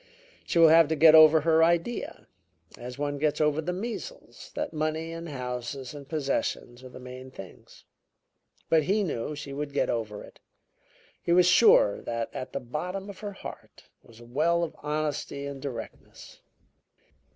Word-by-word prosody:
She - - -1
will 165 -1 +8
have 165 0 +6
to 160 - 0
get 155 +1 +7
over 155 0 +8
her 160 +1 +4
idea, 170 +8 -1 0.5
as 125 +1 -9
one 145 0 -3
gets 150 0 0
over 150 0 +2
the 170 +3 -3
measles, 230 - -7
that - - -3
money 155 +1 -2
and 165 0 -7
houses 125 0 -5
and 140 -2 -11
possessions 135 -4 -3
are 130 - -10
the 125 - -12
main 130 +1 -10
things.' 95 -8 -13 0.8
But 160 -2 +3
he 205 +3 +1
knew 150 -4 -3
she 145 -1 -7
would 145 0 -5
get - - +1
over 110 -3 -4
it; - - -16 0.8
he - - -2
was 180 +1 +6
sure 180 - +5
that 115 -1 -4
at 130 - -6
the - - -3
bottom 180 +10 -5
of 195 - -15
her 205 -1 -6
heart - - -11
was 115 -1 -18
a 120 - -13
well 160 +8 +1
of 165 - -4
honesty 150 -1 -3
and 140 -1 -7
directness. 125 -5 -9
150 Hz, 170 wpm, -27 LUFS, 130-165 Hz, 0.8 s, will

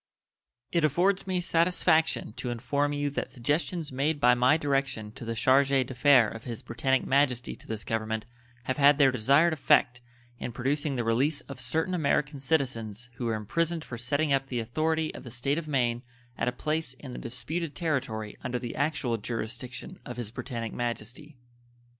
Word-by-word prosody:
It 170 -2 +2
affords 180 +7 +2
me 185 -1 0
satisfaction 165 -6 +2
to 125 - -3
inform 130 +5 0
you 145 0 -1
that - - -3
suggestions 150 +5 -1
made 145 +4 0
by 125 -3 +6
my 125 +5 +4
direction 135 -7 -1
to 110 - -10
the 115 0 -3
charge 130 +4 +4
d'affaires 130 -3 +4
of 115 - -8
His 115 -3 -5
Britannic 130 +3 0
Majesty 130 -3 +1
to - - -16
this 110 -2 -4
Government 110 0 -2 0.4
have 130 +3 -2
had 145 0 +6
their 140 -3 +6
desired 140 +8 +4
effect 125 -4 +3 0.4
in 120 - -5
producing 140 +4 0
the 120 - -1
release 135 +7 +1
of 140 -4 -10
certain 160 +7 0
American 150 -3 +1
citizens 125 -6 -1
who 120 - -3
were 115 -1 0
imprisoned 165 +10 -1
for 125 - -6
setting 145 +4 +1
up 135 0 +1
the 125 - -3
authority 155 +7 0
of - - -9
the 125 - -8
State 135 +6 -1
of 160 - -8
Maine 120 -5 +1 0.3
at - - -1
a - - +2
place 150 +1 -2
in 130 0 -10
the - - -6
disputed 150 +6 -4
territory 130 -10 -2
under 125 -1 -2
the 120 -1 -5
actual 140 -5 0
jurisdiction 120 +3 -6
of 125 -1 -7
His 115 -3 -3
Britannic 115 -2 -5
Majesty. 120 +5 -5
130 Hz, 175 wpm, -28 LUFS, 120-150 Hz, 0.4 s, by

